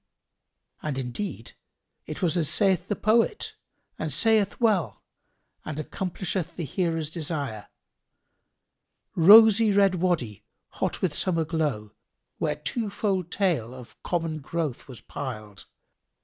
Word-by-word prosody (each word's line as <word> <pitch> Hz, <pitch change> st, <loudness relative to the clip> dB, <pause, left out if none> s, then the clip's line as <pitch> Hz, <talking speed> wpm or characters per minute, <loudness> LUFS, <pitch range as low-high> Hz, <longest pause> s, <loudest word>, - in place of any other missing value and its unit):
And 150 Hz, -3 st, -3 dB
indeed 125 Hz, -, -5 dB, 0.6 s
it 155 Hz, +4 st, -6 dB
was 170 Hz, -1 st, +1 dB
as 165 Hz, -4 st, 0 dB
saith 190 Hz, -3 st, +2 dB
the 205 Hz, -, -1 dB
poet 230 Hz, -, +1 dB, 0.4 s
and -, -, -3 dB
saith 220 Hz, -3 st, +2 dB
well 215 Hz, -8 st, +1 dB, 0.6 s
and 155 Hz, -1 st, -6 dB
accomplisheth 180 Hz, +1 st, -4 dB
the 175 Hz, -, -4 dB
hearer's 165 Hz, 0 st, -2 dB
desire, 145 Hz, -, -3 dB, 1.5 s
"Rosy 215 Hz, +4 st, +8 dB
red 200 Hz, -1 st, +4 dB
Wady 150 Hz, -, -1 dB, 0.3 s
hot -, -, -3 dB
with 175 Hz, -5 st, +1 dB
summer 165 Hz, -1 st, +1 dB
glow, 150 Hz, -10 st, -2 dB, 0.2 s
* -, -, -54 dB
Where 150 Hz, -2 st, 0 dB
twofold 190 Hz, +2 st, -2 dB
tale 160 Hz, -, -1 dB
of 125 Hz, -2 st, -13 dB
common 165 Hz, -3 st, -2 dB
growth 155 Hz, -2 st, -4 dB
was 125 Hz, -5 st, -11 dB
piled. 110 Hz, -8 st, -7 dB
165 Hz, 120 wpm, -26 LUFS, 145-195 Hz, 1.5 s, Rosy